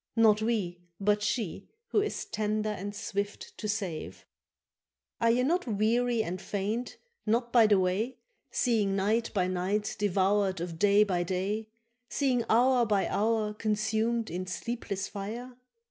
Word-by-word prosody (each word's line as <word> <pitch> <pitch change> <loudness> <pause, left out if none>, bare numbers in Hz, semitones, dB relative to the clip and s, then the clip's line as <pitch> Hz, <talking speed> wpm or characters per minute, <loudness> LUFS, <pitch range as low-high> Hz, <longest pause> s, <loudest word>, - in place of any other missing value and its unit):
—Not 220 -2 +5
we 205 -6 -1 0.2
but 205 +1 +2
she, 210 -3 -2 0.2
who 415 - +3
is 420 - -3
tender 215 0 -1
and 205 0 -5
swift 205 0 -4
to 215 - -3
save 195 -7 -4 0.9
—Are 230 - +3
ye 245 +2 +3
not 340 +3 +1
weary 230 +2 +2
and 180 0 -4
faint 210 +6 -3 0.3
not 235 +2 +1
by 230 -3 +7
the 205 -1 +5
way, 200 +8 0 0.3
Seeing 215 -6 +1
night 215 +4 +1
by 185 -2 +3
night 185 +3 -1
devoured 195 -1 +2
of 170 -1 -5
day 205 +2 +5
by 185 -4 0
day, 190 +5 -2 0.4
Seeing 255 -4 +1
hour 250 +2 +5
by 205 -3 +1
hour 215 0 +1
consumed 220 +2 0
in 185 +2 -4
sleepless 200 -1 -3
fire? 230 +5 -6
210 Hz, 145 wpm, -29 LUFS, 195-230 Hz, 0.9 s, by